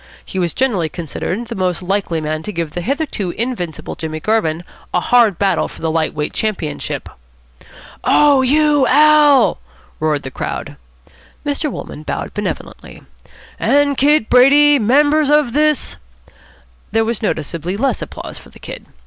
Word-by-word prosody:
He 190 - -5
was 170 -3 -1
generally 205 -12 0
considered 175 - -4
the 235 - -6
most 185 -3 -2
likely 190 -3 -1
man 155 0 -3
to 210 - -6
give 170 -4 -3
the 175 - -4
hitherto 270 - -2
invincible 180 - -3
Jimmy 155 -1 -5
Garvin 170 -5 0 0.3
a - - +4
hard 225 -2 +3
battle 195 -4 +1
for - - -13
the 160 - 0
light 160 -1 -1
weight 150 0 -3
championship. 185 -9 -3 1.0
"Oh, 290 -2 +4
you 295 +1 +3
Al.!" 295 -1 +5 0.4
roared 155 -2 0
the 130 - -6
crowd. - - -5 0.7
Mr. 290 +1 -1
Wolmann 150 - -8
bowed - - -4
benevolently. 210 0 -6 0.3
" - - -22 0.2
and 285 0 +2
Kid 285 -3 +3
Brady, 285 +3 +6
members 290 +6 +3
of 295 -5 +3
this 305 0 +1 0.5
" - - -30
There 225 +1 +2
was 230 +1 -2
noticeably 170 -1 -3
less 270 +4 0
applause - - -7
for - - -16
the - - -17
Kid. - - -9
220 Hz, 155 wpm, -17 LUFS, -, 1.0 s, Brady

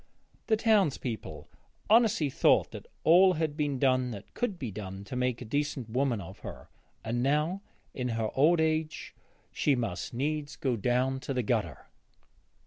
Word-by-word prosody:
The 220 - +3
townsfolk 135 - 0 0.3
honestly 220 - +4
thought - - +3
that - - -9 0.2
all 180 +3 +6
had 155 -3 -2
been 145 -3 -1
done 130 -1 +2
that 105 -3 -9
could 215 -6 -2
be 130 -9 -5
done 95 -1 -7
to 115 - -7
make 125 -1 -1
a - - -10
decent 145 -1 -2
woman 125 -2 +1
of 95 0 -10
her, - - -9 0.4
and 120 +2 -1
now 150 +8 +1 0.3
in 125 -1 -3
her 110 -1 -1
old 160 +5 +4
age 160 0 -1 0.4
she 145 - +2
must 115 -6 -3
needs 145 +3 -2
go 130 -4 -1
down 125 +4 0
to 135 0 -4
the 125 - 0
gutter. - - -2
135 Hz, 160 wpm, -29 LUFS, 120-155 Hz, 0.4 s, all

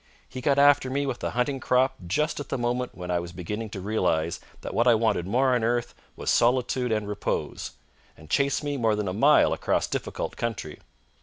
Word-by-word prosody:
He 130 - -7
got 140 +1 +2
after 140 -2 +5
me 140 +2 -1
with 130 -3 -4
a - - 0
hunting 135 +2 0
crop 130 +1 +2
just 150 - 0
at 145 - -7
the - - -1
moment 125 +1 -2
when 90 -1 -5
I 90 - +1
was 85 0 -6
beginning 105 +6 -5
to 100 - -6
realise 85 -5 0 0.2
that - - -6
what 120 - +2
I 120 - +7
wanted 110 -6 +1
most 110 +5 0
on 125 -3 +2
earth 120 +1 0 0.2
was - - -1
solitude 125 0 +2
and 110 -2 0
repose, 105 0 -3 0.4
and 80 - -14
chased 140 - +1
me 145 -1 -2
more 115 -4 +2
than 105 -1 -2
a 90 - -2
mile 105 - +5
across - - 0
difficult - - -4
country. 110 -10 -4
120 Hz, 210 wpm, -26 LUFS, 105-130 Hz, 0.4 s, I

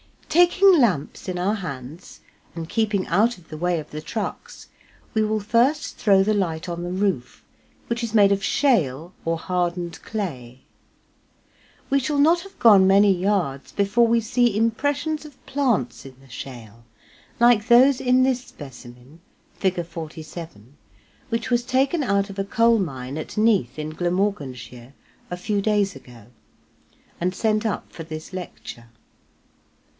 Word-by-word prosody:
Taking 355 +2 +5
lamps 190 - 0
in 180 - -3
our 190 +4 0
hands 155 - -8 0.3
and 165 -1 -5
keeping 210 -2 0
out 215 +6 +2
of 170 -3 -20
the 155 - -7
way 175 +1 0
of 150 - -10
the 155 - -6
trucks, 215 +6 -6 0.4
we 220 - +2
will 215 0 0
first 240 +8 +1
throw 195 -3 +4
the 215 +2 +1
light 175 -5 -2
on 170 0 -4
the 175 - -4
roof, 185 -9 -2 0.4
which 235 +1 -3
is 230 -2 -4
made 200 -2 +6
of 200 0 +1
shale 175 - +1
or 165 0 0
hardened 175 -1 -3
clay. 130 - -6 1.3
We 275 - +4
shall 285 +3 -2
not 320 +5 +4
have 390 +1 -14
gone 205 -5 +6
many 200 +1 +5
yards 180 -7 -1
before 205 +4 +2
we 230 0 +2
see 230 -1 +1
impressions 285 +7 -1
of 290 -4 -15
plants 205 - -1
in 135 -1 -11
the 135 0 -20
shale, 115 -2 -10 0.5
like 235 -2 +4
those 255 +2 +6
in 255 +1 +3
this 255 -1 +1
specimen 130 - -13 0.4
(Fig. 180 -3 -1
47), 160 -6 -9 0.5
which 230 +2 -2
was 240 0 +3
taken 265 +6 +1
out 200 -3 +1
of 195 - -8
a 195 - -1
coal 230 +2 +3
mine 135 -6 -4
at 155 - -8
Neath 210 - +2
in 155 0 -4
Glamorganshire, 150 - -3 0.4
a 180 - -4
few 200 +3 -1
days 205 -2 +1
ago, 115 -4 -14 0.9
and 180 +2 -1
sent 215 +1 0
up 215 - -4
for 165 - -8
this 155 +2 -8
lecture. 170 -9 -8
195 Hz, 150 wpm, -23 LUFS, 160-230 Hz, 1.3 s, made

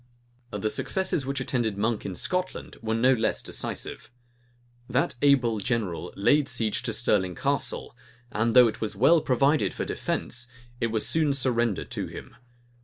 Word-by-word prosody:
The 105 -1 -3
successes 140 +1 0
which 140 0 -2
attended 120 -5 -1
Monk 110 +1 -1
in 95 - -5
Scotland 180 - -2
were 110 -1 -1
no 125 +3 +4
less 115 -3 0
decisive. 115 0 -4 0.8
That 130 +2 +1
able 130 -6 +3
general 100 -7 -2
laid 140 +8 +3
siege 120 +1 0
to 120 - -2
Stirling 105 -5 +1
Castle, - - -1 0.4
and 115 +2 0
though 125 -1 +9
it 110 - -5
was 110 -2 -2
well 145 +10 +5
provided 140 +4 +2
for - - -3
defence, 120 0 -3 0.3
it 115 - +1
was 110 -1 -1
soon 155 -3 +2
surrendered 120 -6 0
to - - -3
him. - - -10
120 Hz, 155 wpm, -26 LUFS, 110-135 Hz, 0.8 s, though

